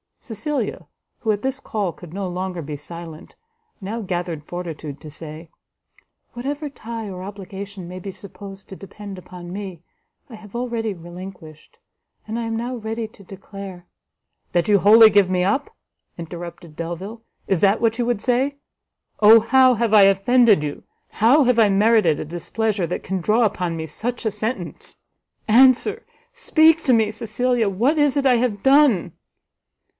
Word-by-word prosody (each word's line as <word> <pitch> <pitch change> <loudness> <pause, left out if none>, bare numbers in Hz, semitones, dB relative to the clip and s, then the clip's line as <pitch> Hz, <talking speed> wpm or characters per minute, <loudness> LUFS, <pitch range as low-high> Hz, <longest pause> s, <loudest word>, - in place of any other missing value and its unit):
Cecilia, 225 - -3 0.3
who 220 - 0
at 205 -1 -2
this 265 +1 -1
call 210 -8 -2
could 170 -1 -13
no 195 0 -3
longer 180 -1 -4
be 150 0 -6
silent, 165 +2 -10 0.4
now 215 +3 -5
gathered 175 -5 -3
fortitude 160 -4 -7
to 155 - -9
say, 155 +1 -10 0.8
"Whatever 285 +5 -4
tie 230 -4 -7
or 185 -1 -7
obligation 195 -1 -8
may 180 +1 -7
be 195 +2 -6
supposed 195 0 -12
to 190 - -8
depend 200 0 -10
upon 175 -1 -10
me, 190 -4 -7 0.5
I 235 - -9
have 215 0 -14
already 235 -3 -2
relinquished; 175 - -11 0.5
and 220 +2 -3
I - - -2
am 225 0 -3
now 240 +3 -3
ready 225 0 -4
to 205 - -18
declare 195 -1 -10 0.3
" - - -51
"That 175 -1 +1
you 205 -1 +4
wholly 220 +3 +8
give 200 -2 +4
me 180 -1 +1
up?" 285 - -1 0.4
interrupted 170 -1 -8
Delvile, 175 +8 -6 0.3
"is 190 - +1
that 200 +3 +3
what 230 -1 +1
you 240 - +1
would 240 -4 -1
say? 260 +3 +1 0.6
Oh 220 +2 +8
how 255 +3 +4
have 230 -1 0
I 210 -2 +8
offended 195 0 +4
you? 145 -1 -5 0.3
how 255 +8 +4
have 250 -2 +3
I 215 -2 +5
merited 205 -5 +3
a - - -4
displeasure 190 +4 -2
that 175 - -4
can 190 -1 -3
draw 215 +6 +2
upon 180 -5 -1
me 160 -1 -4
such 230 - -5
a 220 - +1
sentence? 210 -3 -5 0.5
Answer, 260 - +4 0.3
speak 320 -8 +3
to 260 - +4
me, 220 -2 +3
Cecilia, 235 0 0
what 245 - +1
is 290 -1 +2
it 280 - +1
I 250 -2 +5
have 230 -5 -1
done?" 270 - +4
205 Hz, 165 wpm, -22 LUFS, 180-235 Hz, 0.8 s, wholly